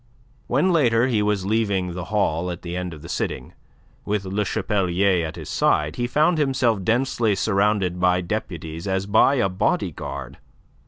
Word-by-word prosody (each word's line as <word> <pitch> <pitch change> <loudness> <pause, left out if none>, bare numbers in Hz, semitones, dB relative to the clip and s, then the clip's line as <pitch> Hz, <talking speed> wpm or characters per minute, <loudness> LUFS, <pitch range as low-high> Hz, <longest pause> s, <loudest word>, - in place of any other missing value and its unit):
When 150 +9 +2
later 120 -7 +3
he 120 -5 +1
was 105 -2 0
leaving 100 -4 0
the 90 -1 -5
hall 90 -4 0
at 85 -1 -6
the 85 0 -5
end 90 -1 -3
of 80 -2 -11
the - - -8
sitting, - - -4 0.5
with 105 -1 -2
Le 100 +3 -1
Chapelier 95 -3 +1
at 80 - -8
his - - -8
side, 75 +1 +1
he 120 - -1
found 155 +6 +2
himself 130 -7 +1
densely 115 -1 +1
surrounded 100 -3 +1
by 90 0 +3
deputies 85 -3 -5
as 95 0 -1
by 110 +7 +4
a 120 -7 +2
body 90 0 0
guard. - - -7
100 Hz, 170 wpm, -23 LUFS, 90-115 Hz, 0.5 s, by